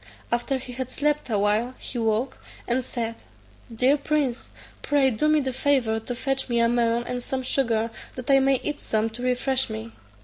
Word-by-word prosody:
After 240 +3 0
he 255 -1 -8
had 260 0 -4
slept 295 +1 0
a 215 - +1
while, 210 +5 +1
he 245 - -4
awoke, 225 +3 0 0.3
and 250 +2 +1
said, 230 -2 -4 0.5
"Dear 255 +5 +3
prince, 285 -4 -1 0.3
pray 280 -2 +3
do 240 +7 +1
me 305 0 +4
the 265 -1 -2
favour 255 -5 +2
to 240 +2 -5
fetch 270 +1 -1
me 235 -1 +2
a 230 - +5
melon 235 0 +2
and 245 0 -3
some 260 +1 -3
sugar, 230 -4 +1 0.2
that 255 +1 -2
I 270 - +7
may 270 0 +4
eat 295 -1 -2
some 220 +1 0
to 235 +2 -8
refresh 255 +1 +1
me." 110 +1 -6
250 Hz, 195 wpm, -25 LUFS, 230-270 Hz, 0.5 s, I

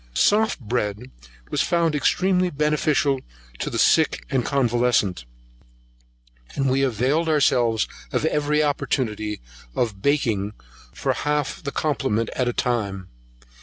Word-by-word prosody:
Soft 215 -2 +3
bread 115 0 -3 0.4
was - - +1
found 170 -2 +1
extremely 180 +5 +2
beneficial 150 -2 +1 0.4
to - - -2
the - - -4
sick 160 -1 +3
and 130 -3 +1
convalescent, 120 - +1 1.3
and 135 -1 +1
we 135 +1 +2
availed 135 +6 +1
ourselves 120 -7 +2 0.2
of - - 0
every 150 -1 +1
opportunity 110 -7 -1 0.3
of 105 -5 -1
baking 110 -8 0 0.4
for - - -1
half 150 -1 -2
the 140 - -4
complement 130 -8 -1
at 125 - 0
a - - +2
time. 100 -7 -2
135 Hz, 120 wpm, -23 LUFS, 115-150 Hz, 1.3 s, Soft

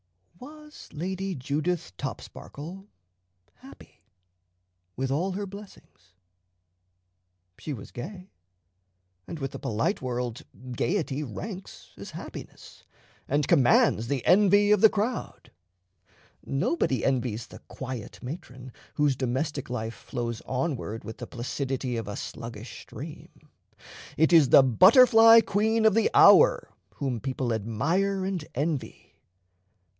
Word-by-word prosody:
Was 300 +3 -13
Lady 190 +4 -4
Judith 145 - -3
Topsparkle 160 - -8 0.7
happy, 265 +2 -16 0.9
with 135 +1 -2
all 180 +7 -1
her 200 +2 -4
blessings? 195 - -14 1.5
She 155 - -6
was 105 -7 -9
gay; 180 +8 -9 1.0
and 165 - -6
with 135 -3 -4
the - - -8
polite 110 +1 -1
world 125 -2 -3 0.3
gayety 150 - -1
ranks 185 - -8
as - - -9
happiness, - - -10 0.4
and 145 0 0
commands 120 -3 +4
the 135 -1 -2
envy 205 +1 +5
of 210 -2 +4
the 220 - +8
crowd. 220 +4 -4 0.9
Nobody 135 -2 -1
envies 120 -4 -1
the - - -13
quiet 130 -5 -7
matron 130 -3 -8 0.2
whose 145 -2 +2
domestic 135 +2 -3
life 115 -2 -4
flows 120 -2 -5
onward 130 -5 -3
with 110 - -9
the - - -7
placidity 130 +1 -3
of 115 -3 -5
a 105 - -5
sluggish 115 0 -8
stream. - - -10 0.9
It 160 +2 +3
is 155 -6 +6
the 135 - +8
butterfly 225 - +7
queen 220 +2 +1
of 220 - +5
the 225 - +2
hour - - +6 0.2
whom 130 -5 -3
people 130 -1 -2
admire 165 - -1
and 190 -4 -3
envy. 140 -4 -3
140 Hz, 115 wpm, -27 LUFS, 125-195 Hz, 1.5 s, the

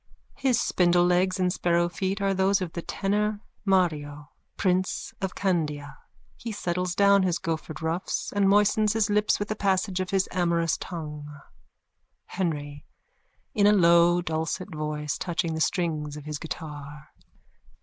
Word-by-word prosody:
His 260 -3 +2
spindlelegs 180 +1 +2
and 180 -1 +1
sparrow 175 -1 +1
feet 190 +3 -3
are 195 0 +2
those 195 +1 +2
of 180 -3 -4
the 170 - -4
tenor 210 +3 -1 0.3
Mario, 150 -6 0 0.3
prince 185 -1 0
of 190 -1 -3
Candia. 150 -7 -1 0.4
He 230 - -6
settles 180 -3 -2
down 200 0 +5
his 180 -2 +1
goffered 160 -1 -4
ruffs 175 +5 -2
and 200 -1 +3
moistens 210 +1 +3
his 220 -1 +1
lips 210 0 +2
with 205 +1 -4
a - - 0
passage 195 -1 0
of 185 -1 -2
his 195 -1 +1
amorous 170 -2 +1
tongue.)_ 150 -4 -7 0.8
HENRY: 145 -6 -3 0.7
_(In 205 -1 +5
a - - +5
low 175 -1 +5
dulcet 160 +4 -3
voice, 150 -1 -3
touching 170 -2 -1
the 160 - -3
strings 155 -4 -1
of 150 - -10
his 150 -1 -4
guitar.) 150 -2 -8
175 Hz, 145 wpm, -26 LUFS, 160-195 Hz, 0.8 s, down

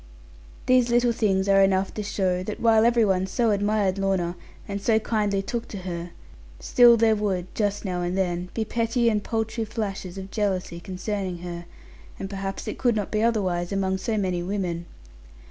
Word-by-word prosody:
These 255 -1 +4
little 240 0 +3
things 200 -4 +1
are 195 0 +5
enough 195 0 +2
to 215 - -4
show 190 -3 -1
that 205 +3 -5
while 225 -1 +4
every 235 -1 +4
one 190 -1 +1
so 225 +4 +1
admired 205 -1 +1
Lorna, 190 -3 0 0.3
and 200 0 -4
so 220 +1 +3
kindly 210 -3 0
took 235 +3 -4
to 205 - -7
her, 175 -1 -5 0.5
still 240 -1 +6
there 220 -1 +4
would, 190 -4 -2
just 205 -1 -1
now 180 -2 -2
and 175 +1 -2
then, 180 -1 -1
be 225 - -1
petty 230 +1 +1
and 210 -2 0
paltry 225 0 -2
flashes 200 -4 -4
of 195 0 -7
jealousy 190 -5 -1
concerning 190 0 -4
her; 175 -1 -6 0.5
and 195 0 -6
perhaps 195 0 -5
it - - -5
could 245 -3 +2
not 210 -2 -2
be 215 - +1
otherwise 190 -6 0
among 190 -1 0
so 220 +3 -1
many 185 -3 0
women. 175 -2 -3
200 Hz, 180 wpm, -25 LUFS, 185-220 Hz, 0.5 s, still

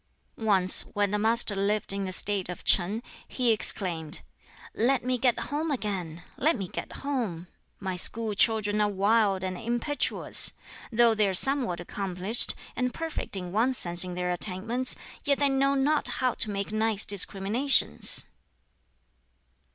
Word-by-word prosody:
Once, 195 -5 +2
when 205 -1 0
the 210 - -1
Master 225 -1 +3
lived 200 +1 -1
in 200 0 -3
the 185 - -5
State 195 0 +2
of 180 - -7
Ch'in, 200 +6 +1 0.2
he 250 -3 +1
exclaimed, 175 -7 0 0.5
"Let 250 +2 0
me 255 -1 -1
get 250 -2 +1
home 310 +3 -2
again! 190 - -4
Let 310 +1 +1
me 195 -3 -5
get - - -7
home! 225 -12 -3 0.3
My 190 -2 -4
school 220 +4 +1
children 210 0 +2
are 210 - +2
wild 200 -1 +1
and 185 0 -4
impetuous! 240 +7 +3 0.4
Though 235 0 +4
they 215 -2 +1
are 190 - 0
somewhat 255 -7 +4
accomplished, 190 +4 0 0.2
and 250 0 -1
perfect 325 -6 -5
in 180 -2 -6
one 230 +6 +1
sense 175 -7 +2
in 180 -1 -6
their 180 0 -2
attainments, 215 +8 -2 0.3
yet 280 -1 +1
they 285 -1 +1
know 275 +1 +1
not 290 +3 +2
how 255 -2 -1
to 220 - -2
make 200 0 -4
nice 215 -1 +1
discriminations." 200 - +1
210 Hz, 150 wpm, -26 LUFS, 190-245 Hz, 0.5 s, Though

